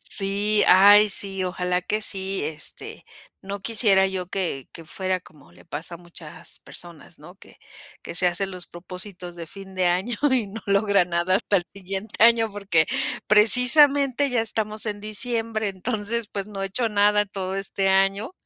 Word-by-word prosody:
Sí. 205 Hz, +1 st, +1 dB
Ay, 205 Hz, +3 st, +7 dB
sí, 195 Hz, -1 st, -2 dB
ojalá 180 Hz, 0 st, -2 dB
que 215 Hz, +4 st, -2 dB
sí. 195 Hz, -2 st, -2 dB
Este, 150 Hz, -1 st, -8 dB, 0.4 s
no 200 Hz, +1 st, -6 dB
quisiera 195 Hz, -3 st, +4 dB
yo, 185 Hz, -2 st, -4 dB
que 170 Hz, -9 st, -3 dB
que 165 Hz, -, -12 dB
fuera 185 Hz, +2 st, -3 dB
como 150 Hz, -5 st, -20 dB
le -, -, -20 dB
pasa 165 Hz, +2 st, -7 dB
a -, -, -12 dB
muchas 170 Hz, -3 st, -11 dB
personas, 170 Hz, -3 st, -13 dB
¿no? -, -, -14 dB
Que -, -, -18 dB, 0.4 s
que -, -, -8 dB
se 180 Hz, -, +2 dB
hacen 190 Hz, +3 st, -2 dB
los 180 Hz, -1 st, -9 dB
propósitos 180 Hz, 0 st, -10 dB
de 170 Hz, -1 st, -8 dB
fin 195 Hz, +1 st, -11 dB
de 185 Hz, -1 st, +1 dB
año, 190 Hz, +7 st, -1 dB, 0.2 s
y 240 Hz, -6 st, +1 dB
no 205 Hz, +2 st, -8 dB
logran 200 Hz, -2 st, +2 dB
nada 175 Hz, +2 st, +1 dB
hasta 200 Hz, 0 st, +1 dB
el 175 Hz, -, -4 dB
siguiente 195 Hz, +2 st, -6 dB
año, 230 Hz, -1 st, +6 dB
porque 195 Hz, -6 st, +1 dB, 0.4 s
precisamente, 270 Hz, +5 st, +5 dB
ya 245 Hz, -2 st, 0 dB
estamos 215 Hz, -1 st, -4 dB
en 205 Hz, -1 st, -4 dB
diciembre, 225 Hz, 0 st, -2 dB
entonces, 215 Hz, +3 st, -3 dB
pues, 200 Hz, 0 st, -5 dB
no 195 Hz, -2 st, -6 dB
he -, -, -2 dB
hecho 230 Hz, +4 st, -2 dB
nada 210 Hz, 0 st, +2 dB
todo 190 Hz, -1 st, -5 dB
este 195 Hz, 0 st, -2 dB
año, 195 Hz, -, +1 dB
195 Hz, 170 wpm, -23 LUFS, 180-215 Hz, 0.4 s, Ay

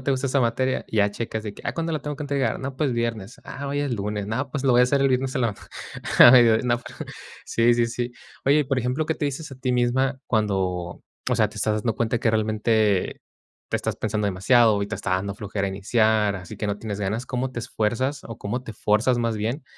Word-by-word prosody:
no -, -, -11 dB
te 140 Hz, -, -1 dB
gusta 135 Hz, 0 st, 0 dB
esa 135 Hz, +1 st, +1 dB
materia, 125 Hz, +2 st, 0 dB
ya 105 Hz, -2 st, +2 dB
checas 110 Hz, +1 st, -4 dB
de 105 Hz, -, -4 dB
que, -, -, -13 dB
ah, -, -, -1 dB
¿cuándo 165 Hz, 0 st, -2 dB
la 155 Hz, -, -1 dB
tengo 150 Hz, -1 st, -5 dB
que 150 Hz, -, -6 dB
entregar?, 140 Hz, -5 st, 0 dB
no, 135 Hz, 0 st, -5 dB
pues, 140 Hz, -2 st, 0 dB
viernes. 115 Hz, -2 st, -3 dB
Ah, 140 Hz, -, -6 dB
hoy 145 Hz, +1 st, -1 dB
es 145 Hz, -3 st, -1 dB
lunes. 105 Hz, -1 st, -3 dB
No, 130 Hz, +6 st, -2 dB
pues, 140 Hz, +1 st, -4 dB
lo 130 Hz, -, +4 dB
voy 120 Hz, -, +5 dB
a -, -, +7 dB
hacer 140 Hz, +2 st, +1 dB
el 135 Hz, -, +4 dB
viernes 130 Hz, 0 st, 0 dB
en 130 Hz, -, 0 dB
la 115 Hz, -3 st, 0 dB, 0.6 s
a 120 Hz, -, +11 dB
mediodi 120 Hz, -2 st, +6 dB
no, 120 Hz, 0 st, +1 dB, 0.6 s
sí, 120 Hz, +1 st, +3 dB
sí, 120 Hz, -1 st, +2 dB
sí. 120 Hz, +1 st, -4 dB, 0.3 s
Oye, 145 Hz, +2 st, +5 dB
y -, -, 0 dB
por 135 Hz, -1 st, 0 dB
ejemplo, 125 Hz, +5 st, -1 dB
¿qué 160 Hz, -, 0 dB
te 150 Hz, -, -3 dB
dices 145 Hz, +3 st, -5 dB
a -, -, -9 dB
ti 130 Hz, -1 st, -1 dB
misma 130 Hz, +2 st, +1 dB
cuando, 95 Hz, -5 st, -1 dB, 0.3 s
o -, -, +2 dB
sea, -, -, +3 dB
te -, -, -15 dB
estás 110 Hz, -1 st, 0 dB
dando 115 Hz, -1 st, 0 dB
cuenta 115 Hz, +1 st, 0 dB
que 115 Hz, -2 st, +2 dB
realmente 110 Hz, -2 st, +1 dB, 0.5 s
te -, -, +1 dB
estás -, -, -3 dB
pensando 105 Hz, -1 st, -2 dB
demasiado 105 Hz, +2 st, +3 dB
y -, -, -2 dB
te 105 Hz, -, -4 dB
está 100 Hz, -2 st, -4 dB
dando 95 Hz, +2 st, -1 dB
flojera 100 Hz, -1 st, -3 dB
iniciar, 105 Hz, +1 st, +1 dB
así 90 Hz, -2 st, -9 dB
que 105 Hz, -, -3 dB
no 100 Hz, 0 st, -2 dB
tienes 105 Hz, -2 st, -5 dB
ganas? 105 Hz, +5 st, -2 dB
¿Cómo 130 Hz, +1 st, -2 dB
te 120 Hz, -, -5 dB
esfuerzas 120 Hz, +6 st, -1 dB
o 115 Hz, -, -8 dB
cómo 120 Hz, +5 st, -3 dB
te 115 Hz, -, -8 dB
fuerzas, 110 Hz, +4 st, +2 dB
más 115 Hz, -2 st, 0 dB
bien 115 Hz, +7 st, -2 dB
115 Hz, 245 wpm, -24 LUFS, 105-130 Hz, 0.6 s, a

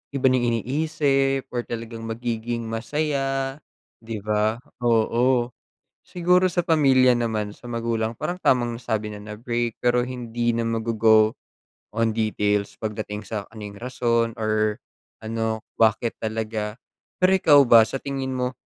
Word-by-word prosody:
iba 135 Hz, -, -1 dB
na -, -, +3 dB
yung 120 Hz, -, 0 dB
iniisip 135 Hz, 0 st, 0 dB
or 120 Hz, -1 st, -3 dB
talagang 115 Hz, -1 st, -6 dB
magiging 115 Hz, 0 st, -3 dB
masaya 135 Hz, +3 st, -2 dB, 0.4 s
'di 110 Hz, -3 st, -7 dB
ba? 110 Hz, +3 st, 0 dB, 0.2 s
Oo. 120 Hz, +1 st, +2 dB, 0.6 s
Siguro 180 Hz, +1 st, +3 dB
sa 175 Hz, 0 st, 0 dB
pamilya 135 Hz, -6 st, +4 dB
naman, 110 Hz, -3 st, -1 dB
sa 115 Hz, -, -16 dB
magulang 115 Hz, -1 st, -2 dB
parang 175 Hz, +8 st, -3 dB
tamang 120 Hz, -7 st, +2 dB
sabi 110 Hz, -3 st, -2 dB
na 105 Hz, 0 st, -8 dB
break 120 Hz, 0 st, -3 dB
pero 120 Hz, 0 st, +2 dB
hindi 120 Hz, -2 st, -2 dB
na 115 Hz, 0 st, 0 dB
maggo-go 110 Hz, -1 st, +3 dB, 0.6 s
on 115 Hz, 0 st, +2 dB
details 105 Hz, -2 st, 0 dB
pagdating 105 Hz, -1 st, -4 dB
sa 105 Hz, -3 st, -3 dB
kung 110 Hz, -1 st, -13 dB
ano -, -, -7 dB
yung 100 Hz, -, -12 dB
rason 115 Hz, -1 st, 0 dB
or 110 Hz, -1 st, 0 dB, 0.4 s
ano 110 Hz, 0 st, -2 dB, 0.2 s
bakit 115 Hz, +1 st, +2 dB
talaga. 110 Hz, -1 st, -3 dB, 0.5 s
Pero 185 Hz, -, +6 dB
ikaw 155 Hz, -6 st, +6 dB
ba 115 Hz, -3 st, +7 dB
sa -, -, -4 dB
tingin 135 Hz, -2 st, -3 dB
mo? 125 Hz, 0 st, -1 dB
115 Hz, 140 wpm, -24 LUFS, 110-130 Hz, 0.6 s, ba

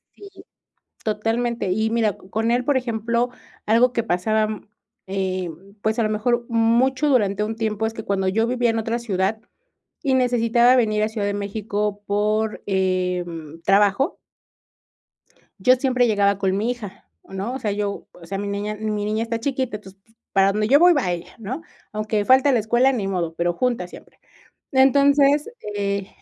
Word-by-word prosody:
Sí. 405 Hz, -, -12 dB, 0.8 s
Totalmente 225 Hz, 0 st, -1 dB
y, 220 Hz, +3 st, 0 dB
mira, 225 Hz, -3 st, +1 dB
co -, -, -18 dB
con 225 Hz, +1 st, 0 dB
él, 245 Hz, +1 st, +1 dB
por 285 Hz, +1 st, +2 dB
ejemplo, 235 Hz, 0 st, -1 dB, 0.4 s
algo 235 Hz, +3 st, +4 dB
que 235 Hz, -, 0 dB
pasaba, 215 Hz, +2 st, +1 dB
mm, 215 Hz, -1 st, -7 dB, 0.4 s
eh, 185 Hz, -2 st, -2 dB, 0.3 s
pues, 220 Hz, +2 st, 0 dB
a -, -, +3 dB
lo 215 Hz, -, 0 dB
mejor, 235 Hz, +3 st, 0 dB
mucho 240 Hz, +5 st, +2 dB
durante 210 Hz, -6 st, +2 dB
un 220 Hz, +1 st, -4 dB
tiempo 220 Hz, -1 st, -1 dB
es 225 Hz, -, -4 dB
que 220 Hz, -, -6 dB
cuando 190 Hz, -1 st, 0 dB
yo 225 Hz, +4 st, +1 dB
vivía 245 Hz, -1 st, +1 dB
en 225 Hz, -, -1 dB
otra 225 Hz, +2 st, -1 dB
ciudad 205 Hz, -1 st, -1 dB, 0.6 s
y 270 Hz, -2 st, +1 dB
necesitaba 245 Hz, -1 st, +3 dB
venir 215 Hz, -3 st, +2 dB
a 215 Hz, -, +2 dB
Ciudad 220 Hz, -2 st, -3 dB
de 205 Hz, -, -1 dB
México 205 Hz, 0 st, -3 dB
por, 215 Hz, +1 st, 0 dB
em, 180 Hz, -4 st, -2 dB
trabajo 200 Hz, -, +2 dB, 1.4 s
yo 250 Hz, +7 st, +5 dB
siempre 250 Hz, -1 st, +1 dB
llegaba 200 Hz, -2 st, +2 dB
con 190 Hz, -1 st, 0 dB
mi 225 Hz, +4 st, 0 dB
hija, 205 Hz, -6 st, -9 dB, 0.2 s
¿no? 195 Hz, +5 st, -4 dB
O 265 Hz, -, -4 dB
sea, 210 Hz, -, -2 dB
yo, 205 Hz, 0 st, -3 dB
o 170 Hz, -, -14 dB
sea, 195 Hz, +3 st, -4 dB
mi 200 Hz, 0 st, -4 dB
niña 205 Hz, +1 st, -3 dB
mi 210 Hz, -1 st, -3 dB
niña 215 Hz, +2 st, -1 dB
está 230 Hz, 0 st, -3 dB
chiquita, 260 Hz, -3 st, -2 dB
entonces, 195 Hz, -2 st, -15 dB
pues, 225 Hz, -, -31 dB, 0.2 s
para 195 Hz, 0 st, +4 dB
donde 210 Hz, +1 st, 0 dB
yo 280 Hz, +5 st, +6 dB
voy 350 Hz, +1 st, +7 dB
va 270 Hz, -, 0 dB
ella, 175 Hz, 0 st, -6 dB
¿no? 250 Hz, +9 st, -5 dB, 0.3 s
Aunque 215 Hz, -1 st, -1 dB
falte 265 Hz, +3 st, +5 dB
la 245 Hz, -, +3 dB
escuela, 240 Hz, +5 st, +3 dB
ni 220 Hz, -7 st, -2 dB
modo, 175 Hz, -4 st, -2 dB
pero, 175 Hz, +1 st, 0 dB
juntas 230 Hz, -3 st, -1 dB
siempre. -, -, -15 dB, 0.5 s
Entonces, 280 Hz, -, +4 dB, 0.3 s
eh, 200 Hz, -1 st, -2 dB
220 Hz, 180 wpm, -22 LUFS, 200-240 Hz, 1.4 s, voy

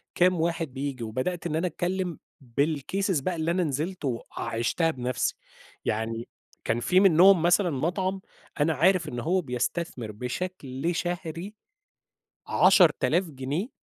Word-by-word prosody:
كام 180 Hz, -1 st, +3 dB
واحد 165 Hz, -4 st, -1 dB
بييجي، 135 Hz, -3 st, -4 dB
وبدأت 165 Hz, +11 st, -2 dB
إن 155 Hz, -, -2 dB
أنا 170 Hz, +3 st, +1 dB
أتكلم 180 Hz, 0 st, -2 dB, 0.2 s
بالcases 150 Hz, -, 0 dB
بقى 180 Hz, +2 st, -1 dB
اللي 160 Hz, +1 st, 0 dB
أنا 180 Hz, +1 st, +1 dB
نزلت 155 Hz, +4 st, -3 dB
وعِشتها 120 Hz, +5 st, -1 dB
بنفسي، 125 Hz, -4 st, -2 dB, 0.5 s
يعني 115 Hz, +2 st, -2 dB, 0.4 s
كان 115 Hz, -, 0 dB
في 180 Hz, +9 st, +3 dB
منهم 190 Hz, -1 st, +6 dB
مثلًا 175 Hz, +2 st, +3 dB
مطعم 185 Hz, +6 st, -1 dB, 0.4 s
أنا 155 Hz, +2 st, +3 dB
عارف 180 Hz, +5 st, +3 dB
إن 120 Hz, -, -4 dB
هو 180 Hz, +8 st, +1 dB
بيستثمر 125 Hz, -2 st, -3 dB
بشكل 135 Hz, -, -4 dB
شهري 175 Hz, +3 st, -4 dB, 0.9 s
10.000 180 Hz, -1 st, +4 dB
جنيه 140 Hz, -, -3 dB
165 Hz, 125 wpm, -27 LUFS, 130-180 Hz, 0.9 s, منهم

